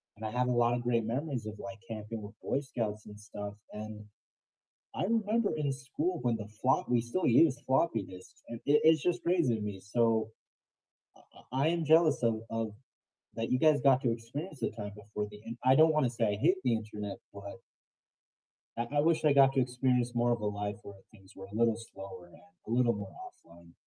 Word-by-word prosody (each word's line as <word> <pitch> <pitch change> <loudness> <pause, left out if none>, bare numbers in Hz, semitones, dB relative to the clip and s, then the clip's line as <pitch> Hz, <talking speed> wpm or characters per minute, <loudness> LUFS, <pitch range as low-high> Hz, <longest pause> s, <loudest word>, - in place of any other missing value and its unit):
and 110 - -8
I 110 - -3
have 125 +1 +1
a - - +1
lot 120 +1 +2
of 120 - -2
great 120 -2 +1
memories 130 -1 -2
of 110 0 -6
like 115 -1 -8
camping 110 0 -6
with 105 - -9
Boy 135 - 0
Scouts 110 -6 -4
and 105 0 -11
stuff. 105 -1 -7 0.2
And 105 0 -7 0.9
I - - -1
remember 220 +1 +1
in 145 -2 0
school 150 +7 -3
when 120 -2 +1
the 105 -1 -7
flop 130 +1 +2
we 120 -1 +3
still 120 +11 -2
used 145 -4 +5
floppy 130 -5 +2
disks. 90 0 -13
It 115 -1 -7 0.3
it's 160 -2 +5
just 180 0 0
crazy 170 -10 +2
to 110 - -4
me. 105 -2 -4
So 110 +1 +1 0.9
I - - -20 0.3
I 135 +2 +1
I - - +5
am 170 0 0
jealous 160 -3 +5
of 115 -1 +3 0.2
of 115 0 -1 0.7
that 115 0 -3
you 125 - +3
guys 155 -1 +4
got 135 -2 +5
to 120 -4 +1
experience 135 +8 -6
the - - 0
time 105 -2 -7
before 105 0 -5
the 105 - -11
in 115 +1 -6
I 130 +1 +6
don't 160 +1 +6
wanna 150 -5 +2
say 115 -1 -3
I 105 -1 0
hate 185 +3 +5
the 125 - +2
internet, 105 -2 -5 0.2
but 100 0 -9 1.2
I 120 - -1
I 145 0 +2
wish 165 0 +2
I 150 -2 +5
got 135 -1 +6
to 135 - +3
experience 125 -1 +1
more 120 0 +2
of 120 - -1
a 105 - -2
life 105 +1 -3
where 100 - -10 0.2
things 95 -3 -19
were 95 - -9
a 100 - -13
little 115 0 +3
slower 95 -5 -10
and - - -19 0.3
a - - -7
little 120 -1 +3
more 100 -4 -7
offline. 85 0 -19
115 Hz, 215 wpm, -31 LUFS, 105-135 Hz, 1.2 s, I